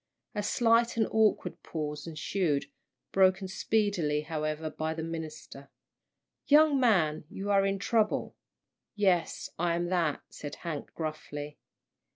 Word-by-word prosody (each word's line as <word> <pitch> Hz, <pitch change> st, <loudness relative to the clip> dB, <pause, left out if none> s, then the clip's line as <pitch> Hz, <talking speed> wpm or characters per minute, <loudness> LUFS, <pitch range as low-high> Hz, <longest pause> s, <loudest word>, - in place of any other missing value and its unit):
A 210 Hz, -, -1 dB
slight 230 Hz, +2 st, +3 dB
and 220 Hz, -, +3 dB
awkward 220 Hz, -1 st, +2 dB
pause 150 Hz, -1 st, -5 dB
ensued, 155 Hz, -2 st, -1 dB, 0.5 s
broken 190 Hz, 0 st, +3 dB
speedily, 185 Hz, -6 st, 0 dB
however, 155 Hz, 0 st, -3 dB
by 160 Hz, +1 st, -3 dB
the 160 Hz, -, -4 dB
minister. 160 Hz, -4 st, -7 dB, 0.8 s
"Young 295 Hz, -1 st, +6 dB
man, 175 Hz, -12 st, +3 dB
you 200 Hz, +1 st, -3 dB
are 195 Hz, -1 st, +4 dB
in 195 Hz, 0 st, 0 dB
trouble." 215 Hz, +2 st, 0 dB, 0.6 s
"Yes, 190 Hz, -5 st, +1 dB
I 170 Hz, 0 st, +2 dB
am 175 Hz, 0 st, -1 dB
that," 170 Hz, -5 st, 0 dB
said 145 Hz, -1 st, -7 dB
Hank, 160 Hz, -4 st, -6 dB
gruffly. 150 Hz, -2 st, -5 dB
170 Hz, 125 wpm, -30 LUFS, 155-205 Hz, 0.8 s, Young